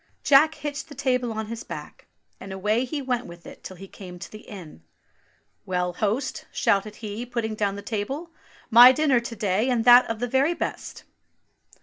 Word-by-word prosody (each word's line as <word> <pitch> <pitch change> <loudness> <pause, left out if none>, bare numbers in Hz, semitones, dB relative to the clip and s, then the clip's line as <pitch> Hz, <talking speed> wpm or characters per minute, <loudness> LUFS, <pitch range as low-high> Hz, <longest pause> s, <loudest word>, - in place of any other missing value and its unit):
Jack 300 +3 +5
hitched 295 0 -6
the 290 - -11
table 250 -3 0
on 220 0 -4
his 230 +1 -7
back, - - -10 0.3
and 190 - -9
away 210 +6 0
he 285 +2 -4
went 250 -1 -2
with 170 0 -13
it - - -12
till 185 - -9
he 195 +2 -11
came 180 -2 -11
to - - -10
the 215 - -10
inn. 170 - -11 0.8
"Well, 180 -1 -2
host," 220 +8 -2
shouted 205 +1 0
he, 215 +1 -6
putting 235 -3 -3
down 205 -2 -1
the 200 - -8
table, 265 +11 -4 0.4
"my 240 +3 +10
dinner 285 -4 +2
to 235 0 -7
day, 210 +3 0
and 240 -3 0
that 245 0 +7
of 230 - -2
the 265 +8 +1
best." - - -5
230 Hz, 185 wpm, -24 LUFS, 200-255 Hz, 0.8 s, my